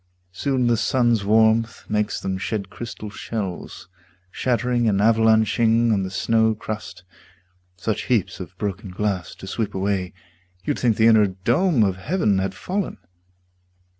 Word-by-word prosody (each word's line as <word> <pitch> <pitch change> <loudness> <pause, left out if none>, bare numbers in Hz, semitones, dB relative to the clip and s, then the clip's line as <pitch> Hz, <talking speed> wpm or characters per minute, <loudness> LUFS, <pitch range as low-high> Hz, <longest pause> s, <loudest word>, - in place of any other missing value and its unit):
Soon 130 +6 0
the 120 -1 +3
sun's 120 -3 +2
warmth 110 +2 +3
makes 105 0 -1
them 95 -1 -3
shed 100 -1 -3
crystal 110 -1 -7
shells 100 -7 -6 0.4
Shattering 120 -1 0
and 100 -2 +1
avalanching 110 +1 +3
on 100 - +1
the 95 - -3
snow 110 +3 +2
crust 105 -4 -7 0.7
Such 110 +4 -2
heaps 100 -7 0
of 90 0 -9
broken 100 0 -4
glass 95 -1 -3
to - - -11
sweep 105 +2 -3
away 95 -1 -1 0.5
You'd - - -2
think 115 -4 +2
the 110 - +4
inner 110 -2 +6
dome 120 - +1
of 95 -2 0
heaven 105 - +1
had 95 0 -2
fallen. 195 - -3
110 Hz, 140 wpm, -22 LUFS, 95-115 Hz, 0.7 s, inner